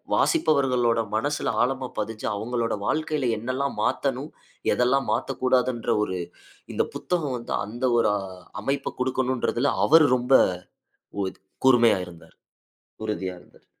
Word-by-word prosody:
வாசிப்பவர்களோட 130 - +2
மனசுல 145 +7 0
ஆழமா 130 0 -2
பதிஞ்சு, 110 0 -4
அவங்களோட 115 +2 -1
வாழ்க்கையில 155 -4 0
என்னல்லா 130 +5 -2 0.2
மாத்தணும், - - -1 0.4
எதெல்லாம் 130 +2 +2
மாத்தக்கூடாதுன்ற 130 -2 0
ஒரு, 95 -3 -3 0.6
இந்த - - +2
புத்தகம் 155 -8 -1
வந்து 120 - -5
அந்த 115 +5 -6
ஒரு, 110 - +3
அ - - -5 0.4
அமைப்ப 135 +4 -2
கொடுக்கணுன்றதுல, 130 0 0 0.2
அவரு 160 0 +7
ரொம்ப 125 +1 -2 0.9
உறு 95 - -2 0.3
கூர்மையா 120 -6 +5
இருந்தாரு. 85 -1 -15 0.7
உறுதியா 95 -4 -3
இருந்தாரு. - - -23
125 Hz, 115 wpm, -25 LUFS, 115-135 Hz, 0.9 s, அவரு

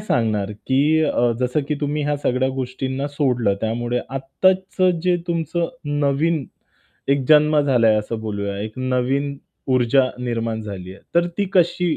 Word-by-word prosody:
सांगणार 110 - 0 0.2
की 145 +4 +3
अ, 120 -5 +2
जसं 125 +4 +1
की 150 - +1
तुम्ही 150 0 -1
ह्या 145 0 0
सगळ्या 130 -2 0
गोष्टींना 130 +2 -3
सोडलं 125 -8 +1
त्यामुळे 120 +2 -1
आत्ताचं 185 +6 +1
जे 180 -1 +3
तुमचं 170 0 -1 0.3
नवीन 145 +2 +1 0.6
एक 140 -1 +2
जन्म 150 0 +5
झालाय 120 -6 +3
असं 110 +1 -3
बोलूया. 100 -2 -3
एक 110 +4 -6
नवीन 130 +2 0 0.4
ऊर्जा 130 +1 +3
निर्माण 115 -2 -2
झाली 95 -3 -7
आहे, 95 - -15
तर 170 0 +4
ती 205 - +2
कशी 175 -2 +2
135 Hz, 145 wpm, -21 LUFS, 115-150 Hz, 0.6 s, जन्म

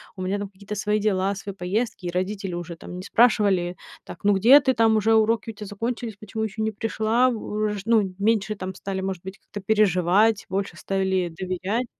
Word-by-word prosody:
У 185 - -5
меня 195 +2 -1
там 205 - -4
какие-то 200 +1 -9
свои 210 +1 0
дела, 200 -1 +1
свои 195 0 -7
поездки, 195 +1 -2
и - - -1
родители 185 0 -3
уже 175 -1 -6
там 175 - -10
не 185 - -7
спрашивали: 200 -6 +3 0.3
"Так, 175 - -11
ну 205 0 +4
где 235 +9 +7
ты 260 -1 +2
там 225 -2 +3
уже, 220 +2 +3
уроки 225 +1 +2
у - - -14
тя 210 -1 -9
закончились, 225 +1 -4
почему 220 +1 -6
ещё 220 0 -2
не 220 - 0
пришла 225 +4 +1
в 240 - -2
уж" 210 -1 -2
Ну, 210 -5 +2
меньше 215 0 +1
там 190 -1 -5
стали, 190 0 -4
может 190 -2 -3
быть, 190 +2 -8
как-то 205 - -9
переживать, 205 +1 +3
больше 195 -1 -2
стали 190 -1 -1
доверять. 190 +6 -2
205 Hz, 205 wpm, -24 LUFS, 190-220 Hz, 0.3 s, где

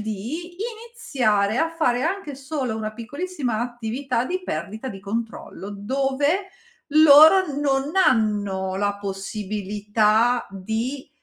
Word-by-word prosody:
di 245 - -5
iniziare 285 - -1
a 325 0 +1
fare 255 -7 +1
anche 325 -4 -2
solo 270 -4 -3
una 215 -1 -4
piccolissima 260 0 -4
attività 240 +1 -2
di 370 +5 -3
perdita 220 +6 -4
di 195 - -7
controllo, 205 -1 -5
dove 275 - 0 0.5
loro 315 +5 +8
non 275 +1 0
hanno 205 - +2
la 205 0 0
possibilità 210 +3 0
di, 220 +8 -4
240 Hz, 105 wpm, -23 LUFS, 210-295 Hz, 0.5 s, loro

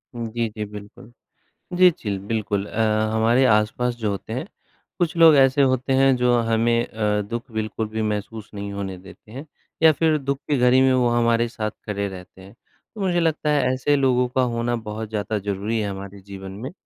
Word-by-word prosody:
जी, 115 0 -2
जी, 105 0 -5
बिल्कुल। 105 +3 -12 0.7
जी, 180 0 +8
जी, 110 -9 -7
ल 100 -1 -2
बिल्कुल 105 -3 -1
अ, 110 - -6 0.3
हमारे 115 +4 +3
आस-पास 110 +2 +1
जो 110 -3 -2
होते 100 +3 -6
हैं, 130 +10 -4 0.5
कुछ 170 -1 0
लोग 165 -2 +8
ऐसे 135 +1 +4
होते 130 0 +1
हैं 135 0 +4
जो 125 0 +2
हमें 115 +1 +2
अ, 105 -1 -1
दुःख 115 +3 -6
बिल्कुल 110 0 -3
भी 110 0 -3
महसूस 105 +1 -4
नहीं 100 0 -6
होने 95 -2 -5
देते 95 +3 -15
हैं 135 +6 -8 0.4
या 160 - +8
फिर 160 0 +2
दुःख 140 -1 -2
की 145 - +2
घड़ी 125 +1 +4
में 130 -1 +4
वो 125 -2 +2
हमारे 115 0 +2
साथ 110 -3 -4
खड़े 100 -1 -2
रहते 95 0 -11
हैं। 95 +3 -14 0.4
तो 210 - -6
मुझे 180 -2 +1
लगता 160 -2 0
है 145 -2 +3
ऐसे 145 +3 +1
लोगों 125 -2 +2
का 130 - +3
होना 120 +1 -1
बहुत 110 -1 -6
ज़्यादा 105 0 -2
ज़रूरी 100 +3 -2
है 105 -1 -2
हमारे 100 0 -8
जीवन 95 -1 -9
में। 115 - -7
115 Hz, 200 wpm, -22 LUFS, 105-130 Hz, 0.7 s, जी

